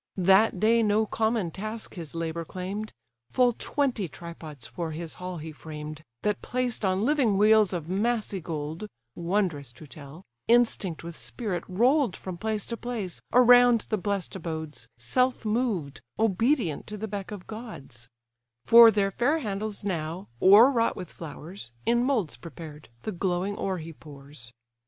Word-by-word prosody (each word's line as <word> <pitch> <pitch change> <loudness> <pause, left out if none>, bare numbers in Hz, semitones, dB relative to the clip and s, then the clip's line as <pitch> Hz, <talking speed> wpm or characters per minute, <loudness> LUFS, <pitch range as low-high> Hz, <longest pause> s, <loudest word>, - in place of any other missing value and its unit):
That 190 +2 +4
day 230 +3 +4
no 215 0 +2
common 220 -4 0
task 215 +4 -6
his 170 -4 -8
labour 165 0 -3
claim'd: 190 +5 -5 0.4
Full 250 -1 +3
twenty 245 -5 -1
tripods 155 -5 -9
for 170 +5 -4
his 165 0 -6
hall 180 -1 -4
he 160 0 -7
framed, 155 0 -8 0.2
That 210 -1 0
placed 250 -3 -2
on 190 +2 +1
living 260 -8 +2
wheels 215 0 +5
of 170 -4 -4
massy 210 0 -1
gold, 160 +4 -5 0.3
(Wondrous 170 - -1
to 125 - -13
tell,) 150 +4 -12 0.2
instinct 225 -8 +2
with 170 0 -7
spirit 205 -3 -3
roll'd 240 +4 +2
From 185 -2 -6
place 215 +3 -2
to 235 - -4
place, 225 -8 -5
around 245 -1 +7
the 215 - +2
bless'd 200 -2 -2
abodes 160 -7 -6
Self 250 - 0
moved, 210 - -1 0.2
obedient 225 - +1
to 210 - -6
the 220 +2 -4
beck 200 -2 -5
of 205 -4 -8
gods: 140 - -10 0.6
For 230 0 +10
their 200 -2 +1
fair 275 +10 +1
handles 210 -6 -3
now, 175 -1 -3
o'erwrought 230 +5 +6
with 180 -3 -8
flowers, 165 -2 -9 0.2
In 235 +1 +3
moulds 245 - 0
prepared, 155 -3 -10
the - - -3
glowing 185 +1 -1
ore 190 -2 -2
he 165 0 -8
pours. 140 -5 -12
195 Hz, 150 wpm, -27 LUFS, 165-225 Hz, 0.6 s, For